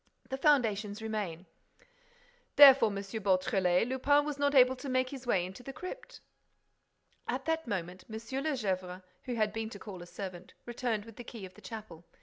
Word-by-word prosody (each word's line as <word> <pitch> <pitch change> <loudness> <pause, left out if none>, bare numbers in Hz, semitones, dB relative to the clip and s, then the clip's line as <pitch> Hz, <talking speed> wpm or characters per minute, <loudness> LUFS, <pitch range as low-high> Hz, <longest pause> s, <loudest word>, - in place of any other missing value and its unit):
The 265 - -3
foundations 215 -8 +2
remain." 210 -6 -4 1.1
"Therefore, 270 -5 +9
M. - - -5 0.2
Beautrelet, 190 -1 +2
Lupin 285 +3 +3
was 295 -2 -4
not 285 0 +2
able 255 0 +6
to 275 - -6
make 255 0 +1
his 265 -2 -9
way 185 -7 +2
into 190 +6 -9
the 270 - -7
crypt." 465 - -9 1.1
At 260 +2 -2
that 320 -3 -1
moment, 185 -3 -4
M. 220 - -5
de 260 +4 -4
Gesvres, 185 -5 -3 0.2
who 245 - -3
had 215 -2 +1
been 225 0 -3
to 210 - -9
call 195 -3 -9
a 175 - -10
servant, 185 -2 -8
returned 235 -3 -2
with 225 -2 -13
the 245 - -7
key 225 -4 -8
of 185 - -12
the - - -17
chapel. 215 -8 -9
220 Hz, 180 wpm, -31 LUFS, 190-260 Hz, 1.1 s, Therefore